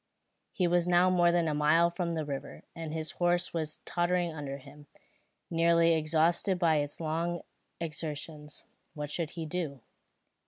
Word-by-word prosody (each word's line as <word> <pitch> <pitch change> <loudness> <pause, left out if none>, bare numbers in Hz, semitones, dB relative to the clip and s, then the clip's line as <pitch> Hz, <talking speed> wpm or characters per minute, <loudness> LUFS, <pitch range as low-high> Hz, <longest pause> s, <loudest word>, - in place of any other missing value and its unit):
He 185 - 0
was 175 0 +2
now 180 +1 +4
more 175 -1 +4
than 170 -1 +2
a 155 - 0
mile 155 +3 +4
from 170 -1 -2
the 155 -1 -2
river, 140 -1 -6
and 165 -2 -5
his 160 -1 -2
horse 175 +1 +1
was 155 -2 -2
tottering 175 -1 0
under 140 -3 -5
him, 145 +2 -15 0.6
nearly 170 0 +4
exhausted 165 +4 +2
by 165 -3 +3
its 145 0 -2
long 165 +2 -2 0.4
exertions. 155 -2 -6 0.3
What 150 -1 -4
should 165 0 -1
he 165 - -3
do? 155 -5 -4
165 Hz, 155 wpm, -30 LUFS, 150-175 Hz, 0.6 s, now